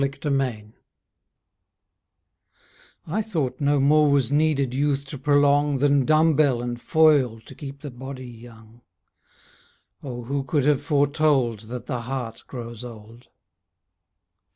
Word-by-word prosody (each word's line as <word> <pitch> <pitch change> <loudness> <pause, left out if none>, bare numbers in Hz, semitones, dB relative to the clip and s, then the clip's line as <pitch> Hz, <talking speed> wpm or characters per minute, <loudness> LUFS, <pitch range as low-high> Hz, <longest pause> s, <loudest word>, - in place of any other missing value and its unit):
A 140 0 +1 0.2
SONG 115 -6 -2 2.3
I 180 +7 -1
thought 160 - -3
no 145 0 +2
more 150 +2 +4
was 140 -3 +1
needed 145 -4 +1
Youth 140 0 0
to 140 +1 -6
prolong 145 0 +3
Than 140 -1 +2
dumb 155 +1 +4
bell 140 -5 +3
and 120 -1 -5
foil 145 -8 +3
To - - -13
keep 140 -1 -9
the 145 -3 -7
body 130 +1 -8
young. 115 -1 -14 1.2
Oh, 120 -3 -6
who 140 +3 -2
could 135 +1 0
have 145 -2 +3
foretold 145 -6 +1
That 125 0 -6
the 125 -4 -3
heart 120 -2 -6
grows 120 -2 -8
old? 115 0 -12
135 Hz, 130 wpm, -24 LUFS, 120-145 Hz, 2.3 s, more